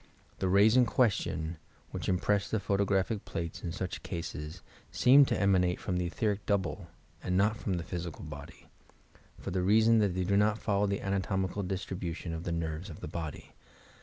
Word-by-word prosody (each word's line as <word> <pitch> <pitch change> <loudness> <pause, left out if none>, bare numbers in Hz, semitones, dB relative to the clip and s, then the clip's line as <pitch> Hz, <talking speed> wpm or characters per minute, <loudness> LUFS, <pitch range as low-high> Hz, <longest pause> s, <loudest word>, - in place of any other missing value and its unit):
The 95 - 0
rays 100 +4 +5
in 125 -2 +5
question, 95 -8 0 0.3
which - - -4
impress 100 +2 +1
the 110 - 0
photographic 100 +1 0
plates 85 -1 -5
in 85 - -4
such 95 +1 -4
cases, 80 -1 -6 0.3
seem 140 +3 +6
to - - -1
emanate 95 -2 +2
from 95 -6 -2
the 90 -1 0
etheric 105 +3 -1
double 95 -7 -1 0.3
and 90 0 -1
not 105 +3 +3
from 100 -4 -2
the 85 - -3
physical 85 -1 -6
body, 75 -2 -10 0.7
for - - -6
the 90 +1 0
reason 110 +4 +5
that 100 -4 +1
they 95 - 0
do 100 +2 +2
not 105 +1 +3
follow 105 -2 +1
the 100 0 -1
anatomical 95 0 -1
dis 95 0 -3
tribution 85 -2 -5
of 80 +1 -5
the 85 - -2
nerves 85 +2 -3
of 80 - -9
the - - -5
body. 80 -1 -6
95 Hz, 185 wpm, -31 LUFS, 85-105 Hz, 0.7 s, seem